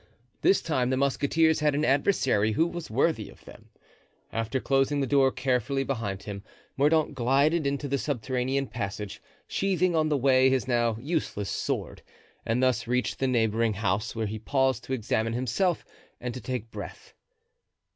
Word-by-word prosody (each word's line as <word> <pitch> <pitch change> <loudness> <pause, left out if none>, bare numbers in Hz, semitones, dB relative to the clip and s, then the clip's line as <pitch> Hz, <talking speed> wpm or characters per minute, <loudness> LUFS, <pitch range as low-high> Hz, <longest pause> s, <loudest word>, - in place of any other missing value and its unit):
This 195 - +3
time 130 -6 0
the 130 - +1
musketeers 145 +4 +2
had 150 -2 +2
an 150 +1 +1
adversary 135 - +2
who 160 - +3
was 175 -1 -5
worthy 140 +8 0
of - - -17
them. - - -14 0.6
After 115 +4 -1
closing 135 +2 +1
the 140 - +1
door 135 -1 +3
carefully 130 +1 0
behind 110 -8 -3
him 100 -1 -7 0.3
Mordaunt 150 +2 +2
glided 140 +5 +2
into 140 +1 -2
the 140 0 -1
subterranean 130 0 -1
passage, 105 -4 -5 0.2
sheathing 185 -2 0
on 155 -1 +2
the 150 - +2
way 130 0 +4
his 130 -1 0
now 120 -3 +1
useless 135 - -2
sword, - - -3 0.5
and 115 +3 +1
thus 125 -2 +1
reached 125 +1 -1
the 135 - +1
neighboring 115 -2 +1
house, 105 +2 -1
where 110 -1 -1
he 110 +1 -4
paused 130 +1 0
to 130 - -3
examine 115 -1 -1
himself 130 - 0 0.3
and 125 -1 -4
to 125 - -7
take 125 -3 -4
breath. - - -9
130 Hz, 165 wpm, -27 LUFS, 115-140 Hz, 0.6 s, way